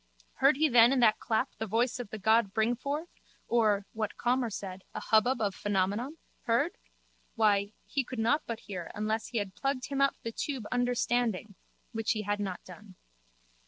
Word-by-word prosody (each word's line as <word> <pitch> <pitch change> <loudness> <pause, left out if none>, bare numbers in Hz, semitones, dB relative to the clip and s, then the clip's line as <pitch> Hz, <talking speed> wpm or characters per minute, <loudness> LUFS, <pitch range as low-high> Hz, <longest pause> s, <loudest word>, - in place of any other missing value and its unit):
Heard 270 +1 +5
he 310 +1 +4
then 240 -2 +6
in 270 - +2
that 220 -3 +5
clap 220 -2 0
the 220 - -2
voice 240 +4 +1
of 240 -4 -5
the 220 - -6
god 220 0 +3
Bringforth 270 +9 0 0.4
or, 215 -4 +2
what 215 -1 -3
Calmer 245 0 +1
said, 190 -2 -6
a - - -2
hubbub 240 +3 +3
of 205 -3 0
Phenomenon? 205 - -1 0.3
Heard? 245 +9 +2 0.6
Why, 205 -2 +2
he 275 - -1
could 255 0 -7
not 235 +7 +2
but 230 -1 -4
hear 180 -4 -6
unless 215 +1 -1
he 240 - -4
had 200 -3 -2
plugged 270 +1 -2
him 275 -1 -1
up 275 - +3
the 230 - -3
tube 260 -1 -4
Understanding 245 -4 0 0.4
(which 225 -1 0
he 215 -1 -3
had 205 +1 -1
not 190 -3 -4
done). 185 +1 -13
225 Hz, 180 wpm, -30 LUFS, 205-250 Hz, 0.6 s, then